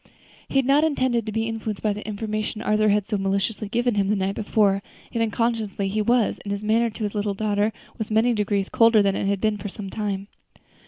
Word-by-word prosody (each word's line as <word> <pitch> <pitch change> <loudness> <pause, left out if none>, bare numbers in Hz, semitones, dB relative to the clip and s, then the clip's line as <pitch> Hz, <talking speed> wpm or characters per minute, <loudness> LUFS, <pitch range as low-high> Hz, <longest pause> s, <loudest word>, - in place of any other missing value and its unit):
He - - -8
had 270 - +3
not 280 +3 +4
intended 255 -7 +1
to - - -2
be 225 +1 -1
influenced 220 -2 -4
by 210 -1 +2
the 210 - -7
information 215 0 -3
Arthur 215 0 +3
had 205 -1 +2
so 210 -3 -1
maliciously 200 +2 -1
given 240 +2 +1
him 200 -2 +1
the 210 - +2
night 195 0 -1
before; 205 -2 +2 0.3
yet 230 - -1
unconsciously 220 -3 -1
he 215 +2 0
was, 235 +1 +2
and 200 - -6
his 200 +1 -3
manner 225 +2 +2
to 220 0 -7
his 205 - -2
little 205 -1 -1
daughter 210 +1 +1 0.3
was 220 - -3
many 225 +3 +3
degrees 205 -2 0
colder 230 -2 +5
than 195 -1 +2
it - - -1
had 200 0 +1
been 215 0 +1
for 205 +1 -5
some 195 -1 -7
time. 200 -2 -3
215 Hz, 225 wpm, -24 LUFS, 200-225 Hz, 0.3 s, colder